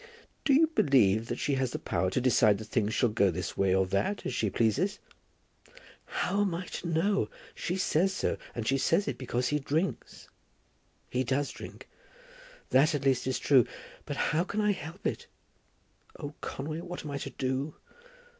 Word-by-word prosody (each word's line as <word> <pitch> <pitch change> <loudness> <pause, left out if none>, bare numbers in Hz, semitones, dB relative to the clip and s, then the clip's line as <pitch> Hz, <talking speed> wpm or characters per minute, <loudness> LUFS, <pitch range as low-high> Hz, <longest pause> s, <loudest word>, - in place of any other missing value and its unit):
"Do 285 - +4
you 320 +4 +6
believe 120 - +3
that 120 - -3
she 145 - 0
has 130 - +1
the - - -1
power 95 - -1
to 95 - 0
decide 120 -5 +4
that 110 - -7
things 110 -1 0
shall 125 - +3
go 100 -2 +3
this 90 0 -3
way 95 -1 +2
or 95 0 +3
that, 100 - -1
as - - -2
she 110 -3 0
pleases?" 120 - +1 1.1
"How 200 +3 -1
am 195 -4 +1
I 180 +2 -4
to 170 - -6
know? 170 +5 +1 0.2
She 180 - -3
says 185 0 +2
so, 190 - -1 0.2
and 115 - -3
she 135 0 +2
says 195 +9 +2
it - - +1
is - - -9
because 125 -1 -1
he 150 - +1
drinks. 155 +6 -2 0.8
He 125 +1 +1
does 135 +3 0
drink. - - -10 0.8
That 150 +5 +5
at 140 - -3
least 130 -2 +2
is 130 - 0
true; 130 -5 +4 0.4
but - - -4
how 165 +3 +1
can 200 +3 -3
I 210 -1 +3
help 170 0 -7
it? - - -2 0.9
Oh, 145 -1 -6
Conway, 155 +4 -4
what 175 -2 -7
am 150 - -5
I 140 - -3
to - - -5
do? 130 +3 -2
140 Hz, 190 wpm, -30 LUFS, 120-170 Hz, 1.1 s, you